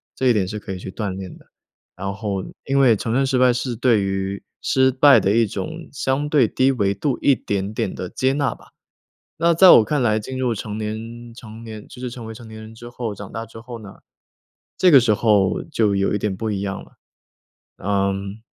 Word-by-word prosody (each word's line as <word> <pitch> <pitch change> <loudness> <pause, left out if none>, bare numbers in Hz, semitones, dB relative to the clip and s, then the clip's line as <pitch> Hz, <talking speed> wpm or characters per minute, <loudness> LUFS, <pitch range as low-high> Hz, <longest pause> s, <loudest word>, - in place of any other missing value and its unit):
这 130 - 0
一 125 - +5
点 100 -4 0
是 105 +2 -5
可 100 - -8
以 - - -5
去 95 - -7
锻 105 -1 -3
炼 95 -2 -8
的。 - - -22 0.5
然 100 +2 -4
后 100 -2 -3 0.2
因 135 0 0
为 125 -5 +5
承 115 +3 -4
认 135 +2 +2
失 130 -1 +1
败， 125 0 +5
是 125 0 -3
对 115 -3 +2
于 95 0 -3 0.2
失 130 0 +3
败 140 +2 +6
的 100 - +1
一 115 -1 +3
种， 160 - -6
相 140 +1 -1
对 145 -6 +4
低 130 +5 +2
维 100 -6 0
度 125 +6 -2
一 140 - +5
点 100 -1 -3
点 95 - -2
地 90 - -5
接 130 +1 0
纳 140 0 0
吧。 - - -19 0.7
那 170 +1 +3
在 185 +2 +8
我 - - +9
看 140 +3 0
来， 110 -2 +2
进 130 +4 -6
入 125 -3 0
成 105 0 -6
年 115 +2 -6
成 115 -2 -11
年 110 -2 -9
就 - - -13
是 125 -1 -4
成 120 -2 -8
为 110 - -7
成 115 +1 -12
年 110 0 -10
人 110 +1 -11
之 120 +1 -10
后， 120 -3 -4
长 100 0 -10
大 115 0 -5
之 115 +1 -13
后 120 0 -9
呢， 100 -2 -11 0.8
这 185 - +5
个 145 - +9
时 110 -3 +2
候 105 -4 +2
就 110 -8 +1
有 100 0 +1
一 - - 0
点 100 -2 -2
不 110 +1 -3
一 100 - -2
样 100 -1 -4
了。 - - -19 0.9
嗯， 100 +1 -1
110 Hz, 245 characters per minute, -21 LUFS, 100-130 Hz, 0.9 s, 我